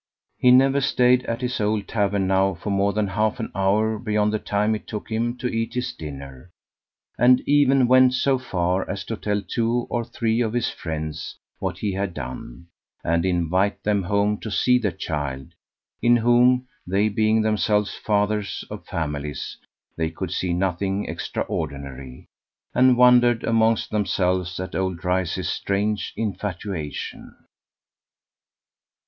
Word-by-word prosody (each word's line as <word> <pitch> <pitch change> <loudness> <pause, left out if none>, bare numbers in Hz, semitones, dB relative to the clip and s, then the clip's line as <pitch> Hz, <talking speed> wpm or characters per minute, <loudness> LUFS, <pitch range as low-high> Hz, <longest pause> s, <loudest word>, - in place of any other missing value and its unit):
He 125 - +5
never 135 +2 +5
stayed 125 -2 +3
at 115 +2 -2
his 125 -2 -2
old 105 -1 0
tavern 100 -3 0
now 95 0 +2
for 100 +5 -5
more 100 +1 +2
than 105 -1 -1
half 110 +5 0
an 115 - -4
hour 105 +3 +1
beyond 105 -1 0
the 110 - 0
time 105 +2 0
it 110 - -5
took 105 +1 -6
him 120 +2 -1
to 125 - -8
eat 115 -1 -2
his 125 0 -2
dinner, 70 0 -9 0.7
and 125 +1 +6
even 140 -3 +4
went 130 0 +5
so 135 0 +2
far 90 -6 -1
as 100 0 -3
to 115 - -4
tell 105 -1 -2
two 115 +5 -1
or 120 - 0
three 115 0 -1
of 110 -2 -1
his 120 -1 0
friends 80 -2 -5 0.2
what - - -3
he 100 -2 -2
had 95 -2 -3
done, 65 +4 -7 0.4
and 85 +2 +1
invite 90 +3 0
them 105 -1 +1
home 100 +3 0
to 110 - -6
see 125 +6 +3
the 105 -5 0
child, 75 -6 -4 0.5
in 120 0 +5
whom 120 +2 +4 0.2
they 100 +4 +2
being 110 +1 +2
themselves 105 -1 +1
fathers 105 -1 -1
of - - -7
families 75 -3 -4 0.4
they 80 0 -1
could 80 - -5
see 90 - -1
nothing 95 +2 -1
extraordinary, 70 -2 -5 0.5
and 130 -1 +5
wondered 120 -1 +5
amongst 115 -1 +2
themselves 90 -3 0
at 95 - -5
old 95 -2 -1
Dryce's 90 0 -1
strange 100 +1 -1
infatuation. 95 -6 -5
105 Hz, 150 wpm, -23 LUFS, 90-115 Hz, 0.7 s, and